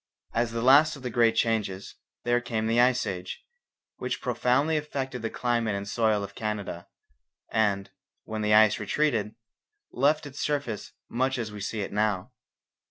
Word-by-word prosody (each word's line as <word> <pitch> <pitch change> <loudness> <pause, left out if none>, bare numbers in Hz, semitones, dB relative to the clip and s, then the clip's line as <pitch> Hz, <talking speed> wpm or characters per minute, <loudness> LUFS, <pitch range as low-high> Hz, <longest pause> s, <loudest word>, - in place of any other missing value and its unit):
As 115 0 +1
the 115 0 -3
last 145 +5 +6
of 140 - -12
the 125 - -3
great 115 -1 +3
changes, 105 -5 -1 0.3
there 120 0 +2
came 115 -3 -2
the 115 +2 +3
Ice 125 0 +3
Age, 90 -1 -5 0.5
which - - -3
profoundly 140 +6 +1
affected 135 -4 -3
the 115 - -2
climate 115 -4 0
and 100 0 -4
soil 110 -1 +1
of 100 0 -7
Canada, 100 -4 -4 0.6
and, 100 -3 +1 0.3
when 110 0 -4
the 105 0 +1
ice 110 -1 +5
retreated, 110 -2 0 0.6
left 145 +4 +2
its 140 -1 -9
surface 140 -8 -2
much 130 +2 0
as 115 -3 -3
we 105 -1 -8
see 105 +2 -3
it 100 - -5
now. 105 -3 0
115 Hz, 165 wpm, -27 LUFS, 105-125 Hz, 0.6 s, last